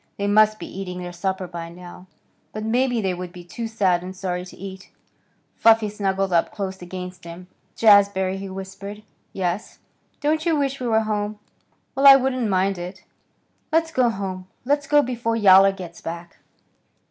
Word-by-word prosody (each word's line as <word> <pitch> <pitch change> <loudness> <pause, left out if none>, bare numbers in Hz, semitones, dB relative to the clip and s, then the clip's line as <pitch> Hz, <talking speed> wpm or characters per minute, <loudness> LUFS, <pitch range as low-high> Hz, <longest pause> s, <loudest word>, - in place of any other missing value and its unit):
They 200 - -2
must 215 +1 +4
be - - -7
eating 180 -1 -6
their 180 -1 -6
supper 190 +1 -2
by 170 -1 -7
now. 180 +1 -12 0.5
But 215 - -5
maybe 245 +1 +1
they 190 -2 0
would 180 0 -6
be 175 0 -11
too 225 +7 -6
sad 195 -6 +1
and 185 +1 -8
sorry 180 -1 -3
to 185 - -13
eat. 190 0 -9 0.7
Fluffy 225 -1 +5
snuggled 195 -2 -1
up 170 - +2
close 190 -2 -5
against 180 0 -8
him. 170 +2 -10 0.3
"Jazbury!" 200 -3 +4
he 195 0 -6
whispered. 195 +2 -8 0.3
"Yes." 185 +1 -3 0.4
"Don't 310 +2 0
you 335 -2 +2
wish 275 -2 -1
we 250 - -3
were 220 -1 +3
home?" 210 -1 -2 0.6
"Well, 275 +1 +4
I 275 - +12
wouldn't 255 -3 0
mind 190 0 +1
it." 180 +2 -8 0.7
"Let's 325 0 +2
go 255 -5 +3
home. 190 -3 -5 0.2
Let's 290 +1 +1
go 295 0 +5
before 235 -3 -2
Yowler 195 -2 +7
gets 180 -3 -10
back." 170 +1 -7
195 Hz, 170 wpm, -23 LUFS, 180-225 Hz, 0.7 s, I